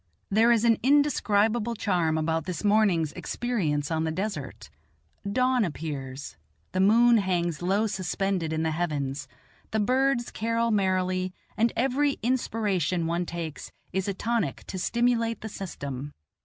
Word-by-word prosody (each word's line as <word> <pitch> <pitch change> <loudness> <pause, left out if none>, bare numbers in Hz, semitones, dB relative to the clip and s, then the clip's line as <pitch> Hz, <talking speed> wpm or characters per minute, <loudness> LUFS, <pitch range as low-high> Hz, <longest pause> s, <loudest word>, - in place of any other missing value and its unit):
There 225 +4 +5
is 235 -1 +3
an 230 -2 +4
indescribable 235 -5 +2
charm 175 -7 +1
about 160 0 0
this 180 0 -4
morning's 200 -7 +3
experience 165 -12 -2
on 160 0 0
the 160 - 0
desert; 160 - -5 0.6
dawn 255 +1 +2
appears, 145 - -5 0.3
the 185 - -2
moon 230 +5 +6
hangs 175 -4 -1
low 195 +5 +1
suspended 190 -3 -1
in 160 0 -1
the 160 - 0
heavens, 145 -4 -2 0.4
the 220 - -1
birds 255 +2 +1
carol 230 +1 0
merrily, 185 -2 0 0.2
and 230 +1 +2
every 270 +3 +2
inspiration 205 - 0
one 170 +1 -1
takes 165 -3 -6 0.2
is 190 +1 -1
a 200 - 0
tonic 225 - -1
to 185 - -5
stimulate 230 +2 +1
the 220 - -5
system. 140 -8 -6
195 Hz, 140 wpm, -27 LUFS, 165-230 Hz, 0.6 s, moon